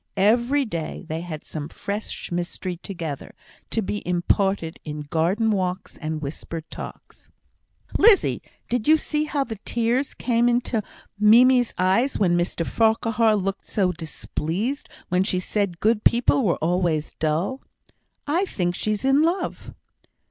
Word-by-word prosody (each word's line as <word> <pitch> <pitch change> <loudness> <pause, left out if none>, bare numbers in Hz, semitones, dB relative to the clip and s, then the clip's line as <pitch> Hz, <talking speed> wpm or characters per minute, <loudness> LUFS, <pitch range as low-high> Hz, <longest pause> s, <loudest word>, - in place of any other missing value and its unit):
Every 240 +8 +3
day 165 -8 -5
they 160 +1 -3
had 160 -3 -7
some 150 -1 -6
fresh 205 +1 -5
mystery 175 +1 -3
together, 165 -6 -6 0.3
to 225 - -1
be 205 +2 -3
imparted 180 -1 0
in 150 -1 -5
garden 175 +9 +1
walks 185 -2 -2
and 155 -1 -4
whispered 160 +3 -6
talks. - - -10 0.7
"Lizzie, 415 -2 +5 0.3
did 245 0 -1
you 315 +1 +7
see 300 0 -1
how 290 -2 0
the 225 -5 -6
tears 240 +4 0
came 240 -1 +2
into 240 -2 +1 0.4
Mimie's 245 +3 +6
eyes 195 +9 +2
when 180 -4 +3
Mr 175 -1 -1
Farquhar 225 +1 +2
looked 195 -1 -2
so 190 -3 +1
displeased 175 - -3 0.2
when 180 0 +2
she 185 -2 0
said 185 -2 -1
good 220 0 +2
people 240 +3 +4
were 180 -6 +2
always 170 -2 0
dull? 165 - 0 0.6
I 335 +7 +1
think 175 - -1
she's 215 +5 -2
in 270 +2 +4
love." 340 +4 -1
200 Hz, 140 wpm, -24 LUFS, 175-235 Hz, 0.7 s, you